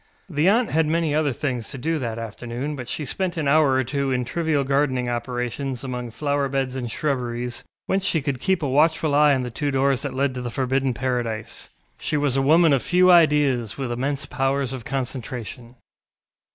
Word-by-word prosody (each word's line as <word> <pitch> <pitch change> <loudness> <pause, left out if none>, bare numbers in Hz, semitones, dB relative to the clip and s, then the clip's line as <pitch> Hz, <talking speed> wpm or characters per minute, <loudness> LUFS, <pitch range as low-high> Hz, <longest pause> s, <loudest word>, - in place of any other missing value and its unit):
The 160 0 +2
aunt 230 +3 +2
had 160 0 +2
many 160 -1 +1
other 150 -1 +2
things 125 -3 -3
to - - -7
do 160 +5 -1
that 115 -4 -3
afternoon, 120 +5 -5
but 125 -3 -7
she 150 - -4
spent 180 +5 -2
an 155 -3 -1
hour 145 -1 +4
or 130 0 +2
two 140 +2 -2
in 125 -1 0
trivial 155 +2 0
gardening 135 -2 +1
operations 125 +1 -3
among 125 -2 -4
flower 140 +3 -1
beds 135 -1 -1
and 125 -3 -3
shrubberies, 125 -2 -3 0.2
whence 190 0 0
she 165 - +2
could 140 -3 -3
keep 190 -4 +1
a - - +1
watchful 155 +2 +2
eye 145 -1 +5
on 130 - -1
the 125 - -5
two 145 +5 -2
doors 135 -1 +1
that 140 -2 -4
led 135 0 +1
to 125 - -5
the 120 - -4
forbidden 130 +1 0
paradise. 120 -4 -3 0.3
She 150 - -1
was 145 -3 +1
a 135 - +2
woman 160 +3 +5
of 135 - +2
few 180 +1 +4
ideas, 145 -9 +3
with 130 -3 -3
immense 140 +3 -2
powers 135 -1 -1
of 125 -4 -7
concentration. 125 -2 -5
135 Hz, 200 wpm, -23 LUFS, 125-150 Hz, 0.3 s, eye